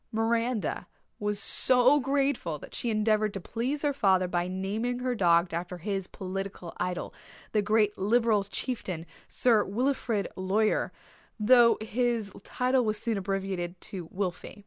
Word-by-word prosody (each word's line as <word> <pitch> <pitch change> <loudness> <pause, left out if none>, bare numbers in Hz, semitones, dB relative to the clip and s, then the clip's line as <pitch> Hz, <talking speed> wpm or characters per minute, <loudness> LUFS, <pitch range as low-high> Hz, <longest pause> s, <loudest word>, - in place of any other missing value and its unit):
Miranda 230 0 0 0.3
was 210 0 -1
so 255 +6 +4
grateful 270 - 0
that - - -12
she 240 - -2
endeavoured 215 -1 +1
to - - -2
please 250 - -2
her 290 -1 +2
father 190 -7 +3
by 175 0 -1
naming 205 +6 -2
her 250 0 -1
dog 170 -4 +3
after 175 +2 -4
his 195 +1 -3
political 190 -2 -6
idol, 180 0 -3 0.4
the 210 - +2
great 210 0 +2
Liberal 220 +1 +3
chieftain, 195 -5 -4 0.2
Sir 230 -4 +3
Wilfrid 230 -1 -1
Laurier 200 +3 +1 0.5
though 235 +2 +6
his 230 -1 -1
title 255 0 +1
was 215 -1 0
soon 225 +1 -1
abbreviated 190 -2 -3
to 180 -4 -7
Wilfy. 185 0 -4
210 Hz, 140 wpm, -28 LUFS, 190-240 Hz, 0.5 s, though